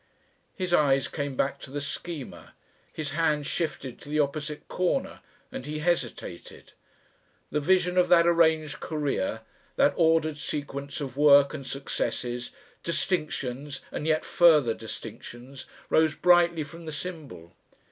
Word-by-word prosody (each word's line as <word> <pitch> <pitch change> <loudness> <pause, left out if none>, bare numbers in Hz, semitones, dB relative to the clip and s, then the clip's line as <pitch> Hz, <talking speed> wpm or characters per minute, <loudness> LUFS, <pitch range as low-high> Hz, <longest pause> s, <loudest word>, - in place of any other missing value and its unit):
His 185 -3 -2
eyes 140 -4 +4
came 145 -3 -4
back 135 +2 0
to - - -9
the 145 +2 -4
Schema. 145 0 -7 0.4
His 150 -2 -4
hands 150 -1 +1
shifted 140 -5 -3
to - - -11
the 150 +1 0
opposite 150 +1 -2
corner 180 -1 -1 0.3
and 130 - -7
he 155 +1 -3
hesitated. 150 - -3 0.8
The 150 - +1
vision 180 +3 +2
of 180 - +3
that 170 -1 +6
arranged 160 -3 +3
Career, 140 -8 -2 0.3
that 145 - +4
ordered 160 -2 +2
sequence 140 -1 -4
of 135 -2 -5
work 145 -1 +6
and 140 -4 -7
successes, 125 -3 -3 0.3
distinctions 150 -6 -2
and 150 - -4
yet 155 -1 +1
further 155 -9 +5
distinctions, 120 +4 -9 0.2
rose 160 -1 +3
brightly 175 -2 +4
from 165 +3 -11
the - - -4
symbol. 150 - -7
150 Hz, 135 wpm, -27 LUFS, 140-165 Hz, 0.8 s, that